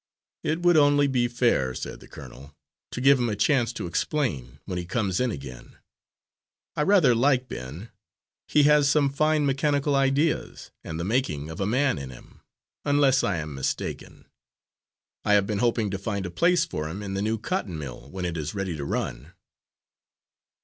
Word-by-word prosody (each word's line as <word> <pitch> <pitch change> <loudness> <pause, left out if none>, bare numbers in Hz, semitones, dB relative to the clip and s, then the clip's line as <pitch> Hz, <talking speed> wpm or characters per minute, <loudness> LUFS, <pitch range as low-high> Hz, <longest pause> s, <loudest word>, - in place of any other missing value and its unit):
"It 160 +3 -1
would 175 -2 +5
only 145 -1 +5
be 125 -3 +1
fair," 120 - +1
said - - -6
the - - -15
colonel, 70 +3 -12 0.3
"to - - -6
give 135 0 +5
him 120 -1 0
a 105 - -1
chance 120 +3 +2
to - - -5
explain, 85 - -2
when 90 - -3
he 90 - -5
comes 95 -2 -1
in 125 0 +1
again. 70 - -9 1.0
I - - 0
rather 165 -7 +5
like 125 +1 +2
Ben. 75 - -8 0.6
He 150 - +4
has 150 -1 +5
some 140 -2 +3
fine 155 +1 +2
mechanical 140 +1 +1
ideas, 140 +3 0
and 80 0 -6
the - - -2
making 95 - -1
of 80 - -8
a 95 - 0
man 130 - +1
in 70 -1 -7
him, 60 - -15 0.4
unless 140 -2 +3
I 95 -4 0
am 75 -2 -5
mistaken. 70 0 -4 1.0
I 105 - +2
have 100 -1 +4
been 105 -1 -2
hoping 115 -4 +1
to 95 - -3
find 100 -1 -3
a 90 - -5
place 170 - +3
for 75 - -4
him 95 +6 -6
in 95 -1 -5
the 95 - -2
new 110 +2 0
cotton 110 - -3
mill, 70 -2 -8
when 95 +1 -5
it 85 -1 -3
is 75 +4 -4
ready 95 -4 -3
to 70 - -5
run." 70 +3 -4
115 Hz, 185 wpm, -25 LUFS, 85-140 Hz, 1.0 s, would